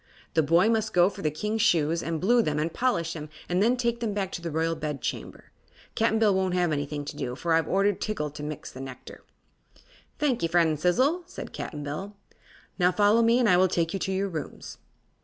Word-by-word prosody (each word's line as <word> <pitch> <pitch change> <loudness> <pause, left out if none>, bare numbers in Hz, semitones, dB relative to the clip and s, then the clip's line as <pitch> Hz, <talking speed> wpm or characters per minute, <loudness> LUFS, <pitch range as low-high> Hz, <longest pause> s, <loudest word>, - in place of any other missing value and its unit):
The 160 - +4
boy 165 +7 +4
must 220 -1 0
go 180 +2 +5
for - - -9
the 155 - +1
King's 210 +9 -2
shoes 165 -5 +2
and 165 -1 -3
blue 235 +7 +4
them 150 -8 -1
and 155 +2 -1
polish 170 -10 0
them 155 -2 -7 0.2
and 180 +2 +1
then 240 +4 +3
take 235 -1 0
them 220 -4 -2
back 195 -2 -2
to 170 - -5
the 170 - -4
Royal 165 +1 0
Bedchamber. 150 -4 -5 0.4
Cap'n 220 0 +2
Bill 215 -2 +4
won't 190 -1 0
have 175 -2 +1
anything 145 0 -3
to - - -6
do, 125 -1 -4
for 165 +4 -1
I've 165 0 +2
ordered 195 0 +1
Tiggle 150 -9 -3
to 150 - -8
mix 150 0 -6
the 130 - -9
nectar." 130 -1 -10 0.9
"Thank 275 -5 0
'e, 165 - +2
friend 165 -3 +2
Sizzle," 260 - +2
said - - -8
Cap'n 150 -3 -6
Bill. 190 +8 -5 0.6
"Now 180 0 +4
follow 210 +4 +4
me 230 +1 +4
and 250 -2 +3
I 180 -3 +5
will 185 +1 +5
take 170 -2 -1
you 195 - -2
to 190 - -2
your 195 +1 0
rooms." 155 -5 -7
180 Hz, 220 wpm, -27 LUFS, 155-215 Hz, 0.9 s, go